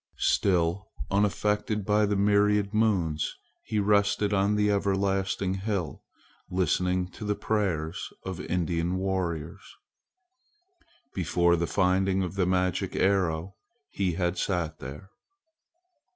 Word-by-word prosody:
Still 90 Hz, 0 st, +1 dB, 0.2 s
unaffected 105 Hz, +1 st, 0 dB
by 105 Hz, +1 st, +3 dB
the 105 Hz, -, 0 dB
myriad 105 Hz, 0 st, +3 dB
moons 90 Hz, -9 st, +1 dB, 0.3 s
he 110 Hz, -, -4 dB
rested 105 Hz, 0 st, +2 dB
on 100 Hz, +1 st, +2 dB
the 105 Hz, 0 st, +2 dB
everlasting 95 Hz, -1 st, 0 dB
hill, 95 Hz, -5 st, -3 dB, 0.5 s
listening 90 Hz, 0 st, +1 dB
to 110 Hz, -, -9 dB
the 105 Hz, 0 st, 0 dB
prayers 90 Hz, -8 st, -2 dB
of 95 Hz, -1 st, -4 dB
Indian 85 Hz, 0 st, -1 dB
warriors. 95 Hz, -1 st, -3 dB, 1.4 s
Before 85 Hz, -1 st, +2 dB
the 85 Hz, 0 st, -1 dB
finding 95 Hz, +1 st, +2 dB
of 90 Hz, -, -4 dB
the 95 Hz, -2 st, 0 dB
magic 90 Hz, -1 st, 0 dB
arrow 95 Hz, -2 st, +1 dB, 0.4 s
he 95 Hz, -3 st, 0 dB
had 85 Hz, +1 st, -1 dB
sat 85 Hz, -5 st, -1 dB
there. 75 Hz, +10 st, -9 dB
95 Hz, 110 wpm, -27 LUFS, 90-100 Hz, 1.4 s, by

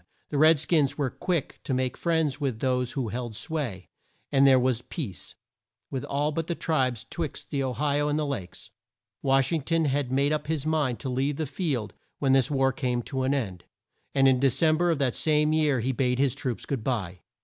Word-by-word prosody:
The 145 Hz, -, 0 dB
red 155 Hz, 0 st, +6 dB
skins 150 Hz, -3 st, +2 dB
were 140 Hz, -4 st, 0 dB
quick 175 Hz, -6 st, -2 dB
to 130 Hz, -, -1 dB
make 130 Hz, 0 st, -1 dB
friends 160 Hz, -4 st, 0 dB
with 130 Hz, -6 st, -1 dB
those 125 Hz, -1 st, 0 dB
who 130 Hz, -5 st, -2 dB
held 120 Hz, -1 st, -4 dB
sway, 120 Hz, -, -4 dB, 0.4 s
and 140 Hz, 0 st, +5 dB
there 130 Hz, -1 st, +6 dB
was 125 Hz, -2 st, +1 dB
peace 125 Hz, -, -5 dB, 0.6 s
with 130 Hz, -2 st, -3 dB
all 145 Hz, +2 st, 0 dB
the 165 Hz, +2 st, -2 dB
tribes 130 Hz, -10 st, 0 dB
twixt 160 Hz, -5 st, -5 dB
the 140 Hz, -2 st, 0 dB
O 130 Hz, -2 st, -1 dB
hi 145 Hz, +4 st, 0 dB
o 145 Hz, -, +1 dB
and 150 Hz, 0 st, 0 dB
the 155 Hz, -, 0 dB
Lakes. 110 Hz, -11 st, -6 dB, 0.5 s
Wash 135 Hz, +1 st, +2 dB
ing 165 Hz, -2 st, +1 dB
ton 165 Hz, +3 st, +1 dB
had 140 Hz, -2 st, 0 dB
made 140 Hz, +3 st, +2 dB
up 150 Hz, -1 st, -2 dB
his 155 Hz, -3 st, -1 dB
mind 150 Hz, -6 st, +1 dB
to 135 Hz, -, -3 dB
leave 135 Hz, +3 st, 0 dB
the 155 Hz, -, -2 dB
field 135 Hz, -, -2 dB, 0.2 s
when 135 Hz, -2 st, +2 dB
this 135 Hz, +1 st, +4 dB
war 135 Hz, -2 st, +2 dB
came 125 Hz, -2 st, -1 dB
to 130 Hz, +2 st, -3 dB
an 130 Hz, +2 st, +1 dB
end, 95 Hz, -10 st, -3 dB, 0.5 s
and 135 Hz, -1 st, +5 dB
in 130 Hz, -1 st, +4 dB
De 135 Hz, +1 st, +4 dB
cem 155 Hz, +4 st, +3 dB
ber 175 Hz, +1 st, +2 dB
of 165 Hz, -, +2 dB
the 135 Hz, -3 st, +1 dB
same 150 Hz, 0 st, +2 dB
year 150 Hz, -5 st, +2 dB
he 130 Hz, +4 st, 0 dB
bade 125 Hz, -1 st, 0 dB
his 135 Hz, -2 st, +2 dB
troops 130 Hz, -6 st, -4 dB
good 135 Hz, -6 st, -3 dB
bye. 95 Hz, -9 st, -2 dB
135 Hz, 215 wpm, -27 LUFS, 125-150 Hz, 0.6 s, red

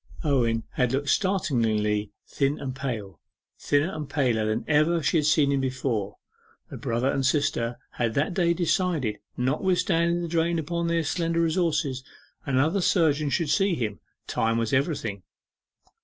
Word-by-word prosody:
Owen 120 Hz, -7 st, +1 dB
had 125 Hz, 0 st, 0 dB
looked 140 Hz, +1 st, -1 dB
startlingly 115 Hz, -, +1 dB, 0.2 s
thin 140 Hz, +1 st, 0 dB
and 130 Hz, -2 st, -5 dB
pale 110 Hz, -, -5 dB, 0.4 s
thinner 145 Hz, +5 st, +1 dB
and 150 Hz, -3 st, -5 dB
paler 125 Hz, -7 st, +1 dB
than 110 Hz, -, -1 dB
ever 155 Hz, +2 st, +2 dB
she 145 Hz, +5 st, +2 dB
had 150 Hz, -2 st, +2 dB
seen 150 Hz, -2 st, +3 dB
him 140 Hz, -1 st, +1 dB
before. 125 Hz, -6 st, -2 dB, 0.6 s
The -, -, -6 dB
brother 120 Hz, +4 st, 0 dB
and 135 Hz, -, -1 dB
sister 130 Hz, -4 st, 0 dB
had 115 Hz, -2 st, -2 dB
that 150 Hz, +6 st, +1 dB
day 170 Hz, -2 st, +2 dB
decided 165 Hz, -, 0 dB
that -, -, -38 dB, 0.2 s
notwithstanding 170 Hz, +3 st, +1 dB
the -, -, -2 dB
drain 165 Hz, +1 st, +1 dB
upon 170 Hz, +2 st, -2 dB
their 170 Hz, 0 st, +1 dB
slender 165 Hz, +1 st, 0 dB
resources, 155 Hz, -6 st, 0 dB, 0.4 s
another 145 Hz, +8 st, +2 dB
surgeon 155 Hz, -5 st, +2 dB
should 160 Hz, +1 st, 0 dB
see 195 Hz, -3 st, +2 dB
him. 110 Hz, -7 st, -3 dB, 0.3 s
Time 115 Hz, 0 st, 0 dB
was 115 Hz, -1 st, -1 dB
everything. 130 Hz, -, -1 dB
145 Hz, 155 wpm, -26 LUFS, 120-170 Hz, 0.6 s, seen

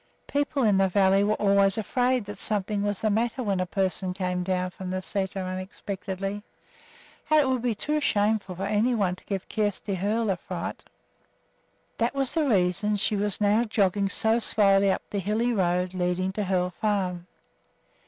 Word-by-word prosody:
People 285 Hz, -1 st, -1 dB
in 205 Hz, -4 st, +4 dB
the 195 Hz, -, +4 dB
valley 195 Hz, +1 st, +3 dB
were 210 Hz, +1 st, +2 dB
always 200 Hz, 0 st, +4 dB
afraid 245 Hz, +2 st, 0 dB
that 205 Hz, -1 st, -8 dB
something 205 Hz, -1 st, -1 dB
was 205 Hz, -1 st, -2 dB
the 215 Hz, -, +1 dB
matter 235 Hz, +4 st, 0 dB
when 200 Hz, -4 st, 0 dB
a 185 Hz, -, -1 dB
person 190 Hz, -1 st, -1 dB
came 180 Hz, -1 st, -2 dB
from 185 Hz, 0 st, -3 dB
the 185 Hz, -, -2 dB
sæter 190 Hz, 0 st, -3 dB
unexpectedly; 195 Hz, +1 st, -5 dB, 0.9 s
and 310 Hz, 0 st, +5 dB
it 285 Hz, -, +3 dB
would 260 Hz, -2 st, 0 dB
be 240 Hz, -2 st, 0 dB
too 300 Hz, +7 st, -1 dB
shameful 205 Hz, -6 st, +1 dB
for 190 Hz, -, -5 dB
any 215 Hz, +5 st, +1 dB
one 190 Hz, -5 st, 0 dB
to -, -, -19 dB
give 195 Hz, -2 st, -4 dB
Kjersti 205 Hz, -1 st, -2 dB
Hoel 210 Hz, +3 st, 0 dB
a 185 Hz, -, -1 dB
fright. -, -, -6 dB, 1.2 s
That 235 Hz, +3 st, 0 dB
was 270 Hz, -2 st, 0 dB
the 310 Hz, -4 st, +1 dB
reason 195 Hz, +1 st, +2 dB
she 205 Hz, +1 st, 0 dB
was 205 Hz, -1 st, 0 dB
now 210 Hz, +2 st, +3 dB
jogging 200 Hz, -3 st, +1 dB
so 220 Hz, +3 st, +2 dB
slowly 195 Hz, -3 st, +3 dB
up -, -, -2 dB
over -, -, -41 dB
the 205 Hz, -, -1 dB
hilly 225 Hz, +5 st, 0 dB
road 180 Hz, -2 st, 0 dB
leading 185 Hz, +1 st, -1 dB
to 205 Hz, +1 st, -3 dB
Hoel 180 Hz, -1 st, 0 dB
Farm. 185 Hz, -3 st, -2 dB
200 Hz, 180 wpm, -26 LUFS, 185-220 Hz, 1.2 s, and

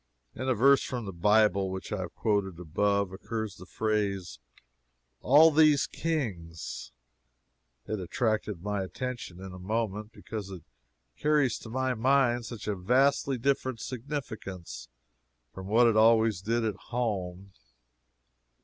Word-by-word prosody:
In 130 Hz, +1 st, -3 dB
a 130 Hz, -, +3 dB
verse 135 Hz, +4 st, +5 dB
from 125 Hz, -4 st, -4 dB
the 95 Hz, -, -6 dB
Bible 100 Hz, +1 st, +3 dB
which 95 Hz, 0 st, -6 dB
I 105 Hz, -, -2 dB
have 90 Hz, -2 st, -6 dB
quoted 100 Hz, -5 st, 0 dB
above, 100 Hz, +3 st, 0 dB
occurs 110 Hz, +1 st, -5 dB
the 90 Hz, -, -12 dB
phrase 100 Hz, -, -2 dB, 0.8 s
"all 155 Hz, +5 st, +6 dB
these 150 Hz, -2 st, +5 dB
kings." 100 Hz, -, -4 dB, 0.9 s
It 110 Hz, -, -3 dB
attracted 105 Hz, -1 st, -1 dB
my 105 Hz, -1 st, -1 dB
attention 120 Hz, -2 st, -5 dB
in 95 Hz, 0 st, -8 dB
a 90 Hz, -, -9 dB
moment, 105 Hz, +1 st, -2 dB
because 105 Hz, -3 st, -7 dB
it 90 Hz, -5 st, -9 dB, 0.5 s
carries 145 Hz, -6 st, +2 dB
to 110 Hz, -, -10 dB
my 130 Hz, +2 st, 0 dB
mind 120 Hz, -1 st, +2 dB
such 115 Hz, -3 st, -8 dB
a 105 Hz, -, 0 dB
vastly 135 Hz, +7 st, +2 dB
different 130 Hz, -1 st, 0 dB
significance 110 Hz, -, -6 dB, 0.6 s
from 95 Hz, 0 st, -8 dB
what 115 Hz, +4 st, +5 dB
it 115 Hz, -2 st, +4 dB
always 110 Hz, -3 st, +4 dB
did 115 Hz, +3 st, 0 dB
at 105 Hz, -3 st, -2 dB
home. 100 Hz, -6 st, -3 dB
110 Hz, 135 wpm, -29 LUFS, 95-125 Hz, 0.9 s, all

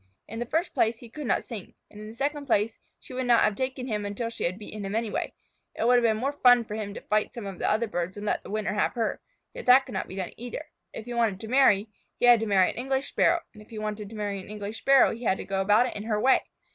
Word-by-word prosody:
In 225 Hz, +2 st, -7 dB
the 240 Hz, -, -3 dB
first 330 Hz, +7 st, -1 dB
place, 225 Hz, +1 st, +2 dB
he 235 Hz, -1 st, -13 dB
could 300 Hz, -1 st, -6 dB
not -, -, +1 dB
sing, 215 Hz, -6 st, -9 dB, 0.2 s
and 210 Hz, -, -11 dB
in 215 Hz, -, -8 dB
the 220 Hz, -, -10 dB
second 285 Hz, +2 st, -2 dB
place 220 Hz, -2 st, +1 dB, 0.2 s
she -, -, -12 dB
would 255 Hz, 0 st, -2 dB
not 240 Hz, -1 st, +5 dB
have 215 Hz, -, +3 dB
taken 260 Hz, +1 st, -3 dB
him 210 Hz, -4 st, -2 dB
until 205 Hz, +3 st, -3 dB
she -, -, -4 dB
had 180 Hz, +2 st, -1 dB
beaten 210 Hz, 0 st, -8 dB
him 195 Hz, +2 st, -3 dB
anyway. 225 Hz, -2 st, -2 dB, 0.4 s
It -, -, -1 dB
would 245 Hz, +1 st, +6 dB
have -, -, +4 dB
been 220 Hz, -2 st, +3 dB
more 270 Hz, +5 st, -1 dB
fun 245 Hz, -4 st, +5 dB
for 210 Hz, -, -7 dB
him 210 Hz, -1 st, -4 dB
to -, -, -7 dB
fight 210 Hz, 0 st, 0 dB
some 235 Hz, -4 st, -6 dB
of 195 Hz, -2 st, -7 dB
the -, -, 0 dB
other 220 Hz, +2 st, +2 dB
birds 185 Hz, -2 st, -4 dB
and 205 Hz, -, -6 dB
let -, -, 0 dB
the -, -, -12 dB
winner 215 Hz, -1 st, -2 dB
have 210 Hz, -, +1 dB
her, 230 Hz, -3 st, -2 dB, 0.3 s
yet -, -, -9 dB
that 260 Hz, +2 st, +7 dB
could -, -, -10 dB
not 190 Hz, -, -3 dB
be 185 Hz, -, -9 dB
done 190 Hz, -2 st, -4 dB
either. 245 Hz, +6 st, -6 dB, 0.3 s
If 220 Hz, -, -8 dB
he 245 Hz, -, -6 dB
wanted 225 Hz, -5 st, +1 dB
to 220 Hz, -, -7 dB
marry, 230 Hz, -5 st, +4 dB, 0.3 s
he -, -, +1 dB
had 240 Hz, -1 st, +7 dB
to 225 Hz, -, -2 dB
marry 190 Hz, -3 st, +4 dB
an -, -, -14 dB
English 265 Hz, +2 st, -1 dB
Sparrow, 340 Hz, 0 st, +3 dB
and 215 Hz, -, -14 dB
if 210 Hz, -, -17 dB
he 225 Hz, -, -9 dB
wanted 210 Hz, -1 st, -4 dB
to 225 Hz, -, -10 dB
marry 205 Hz, -2 st, -3 dB
an 185 Hz, -, -11 dB
English 210 Hz, +1 st, -6 dB
Sparrow 275 Hz, -1 st, +5 dB
he 235 Hz, +2 st, -9 dB
had 190 Hz, -, +2 dB
to -, -, -7 dB
go 195 Hz, 0 st, -1 dB
about 210 Hz, +5 st, +4 dB
it -, -, -5 dB
in 205 Hz, -, -5 dB
her 215 Hz, -2 st, 0 dB
way. 260 Hz, +4 st, +4 dB
220 Hz, 295 wpm, -27 LUFS, 205-245 Hz, 0.4 s, that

